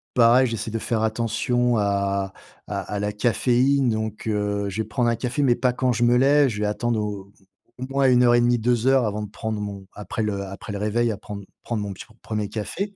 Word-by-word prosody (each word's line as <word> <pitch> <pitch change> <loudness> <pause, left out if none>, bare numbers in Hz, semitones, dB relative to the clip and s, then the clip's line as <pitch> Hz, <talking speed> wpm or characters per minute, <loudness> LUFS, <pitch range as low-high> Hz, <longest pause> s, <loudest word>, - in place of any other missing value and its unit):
pareil, 125 +2 +5
j'essaie 115 -1 -4
de 115 - -2
faire 110 -1 -1
attention 120 +2 0
à 100 -1 0 0.3
à - - -3
à 105 - -4
la 105 0 -1
caféine, 125 +5 +2
donc, 110 -1 -3
heu, 105 -1 -1
je 105 +3 -2
vais 110 - -5
prendre 120 +1 +1
un 115 - +1
café, 125 +5 -2
mais 120 -3 +4
pas 125 +1 +1
quand 125 -1 +1
je 120 - 0
me 120 +1 +4
lève. 140 +2 +5
Je 105 -3 -4
vais 105 - +1
attendre 115 +2 -1
au 100 -2 -5 0.5
au 125 - -6
moins 135 -1 +3
1 125 0 +5
heure 120 0 +5
et - - +5
demie, 120 0 +3
2 120 +1 +1
heures 135 -2 +4
avant 105 0 -2
de 105 - -6
prendre 110 0 -4
mon 100 -2 -6
après 105 +2 -4
le 100 -2 -2
après 100 +2 -8
le 100 - -3
réveil, 115 +3 +1
à 105 - -4
prendre 100 -1 -8 0.2
prendre 110 -3 -2
mon 100 - -4
peti - - -10 0.2
1er 105 -1 -2
café. 195 - -4
110 Hz, 235 wpm, -23 LUFS, 105-120 Hz, 0.5 s, pareil